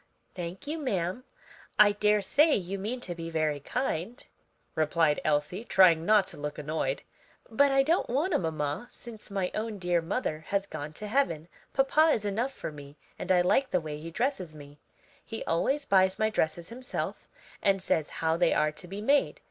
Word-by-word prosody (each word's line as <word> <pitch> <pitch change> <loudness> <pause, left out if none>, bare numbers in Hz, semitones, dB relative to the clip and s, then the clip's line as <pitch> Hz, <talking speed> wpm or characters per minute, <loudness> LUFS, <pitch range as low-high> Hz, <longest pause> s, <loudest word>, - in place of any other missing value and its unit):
"Thank 175 +6 -6
you, 310 +3 -3
ma'am, 195 - -2 0.5
I 210 -1 +7
daresay 210 +9 +3
you 195 0 -3
mean 235 +6 -3
to 180 - -3
be 165 -1 -6
very 155 -3 0
kind," 230 - -3 0.5
replied 155 -1 +2
Elsie, 150 +7 0
trying 175 -7 +5
not 210 -2 +5
to - - -10
look 145 0 -5
annoyed, 150 -2 -2 0.5
"but 280 +5 +4
I 270 0 +4
don't 330 +6 +1
want 300 +9 0
a - - +3
mamma, 155 +4 -2
since 225 -3 -12
my 195 -2 -2
own 215 -1 -3
dear 175 -2 +1
mother 160 -3 -3
has 200 -1 0
gone 150 -5 -7
to 210 +7 -6
heaven; 205 - 0 0.2
papa 300 +4 +4
is 215 - -2
enough 225 +6 -1
for 215 - -6
me, 145 0 -12 0.2
and - - -2
I 180 -1 +5
like 260 +9 +2
the 180 - +2
way 150 -2 -6
he 165 +2 -7
dresses 190 - -2
me. 145 0 -13 0.4
He 225 -1 -6
always 270 - 0
buys 190 -1 +3
my 220 0 +1
dresses 165 -3 -1
himself 250 +2 -5 0.3
and 195 -1 +3
says 160 -5 0 0.2
how 160 +1 +2
they 175 -1 +3
are 150 0 +2
to 175 - -9
be 195 +3 -6
made. 280 +6 +2
190 Hz, 185 wpm, -29 LUFS, 160-235 Hz, 0.5 s, I